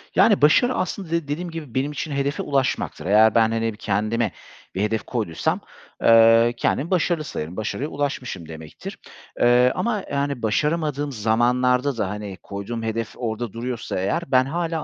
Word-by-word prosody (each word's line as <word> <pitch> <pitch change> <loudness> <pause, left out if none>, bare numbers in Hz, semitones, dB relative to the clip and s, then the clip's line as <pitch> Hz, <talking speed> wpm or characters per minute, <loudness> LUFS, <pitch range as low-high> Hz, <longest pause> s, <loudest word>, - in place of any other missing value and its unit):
Yani 210 -6 +5
başarı 245 - +5
aslında 185 -1 -3
de 170 -3 -1
dediğim 170 +5 -3
gibi 150 -7 -8
benim 135 +3 0
için 150 +1 -5
hedefe 140 0 -1
ulaşmaktır. 135 -9 -1
Eğer 105 +2 +5
ben, 110 -1 +4
hani, 115 0 -1
kendime 110 +1 0 0.4
bir 95 - -1
hedef 110 +1 0
koyduysam, 105 -10 -2 0.4
eee, 115 +1 +6
kendimi 150 +8 0
başarılı 175 -3 +1
sayarım, 85 - -6
başarıya 125 +6 -3
ulaşmışım 130 - -4
demektir. 80 -1 -9 0.4
Eee, 125 +1 +5
ama 220 -4 -1
yani, 140 -2 -1
başaramadığım 145 +5 0
zamanlarda 125 +3 +1
da 100 -4 -1
hani, 105 -2 -6
koyduğum 100 +4 -5
hedef 115 0 -3
orada 115 -2 -4
duruyorsa 115 -4 -4
eğer 100 - 0
ben 130 0 +5
hâlâ 165 +2 -2
125 Hz, 155 wpm, -23 LUFS, 110-145 Hz, 0.4 s, eee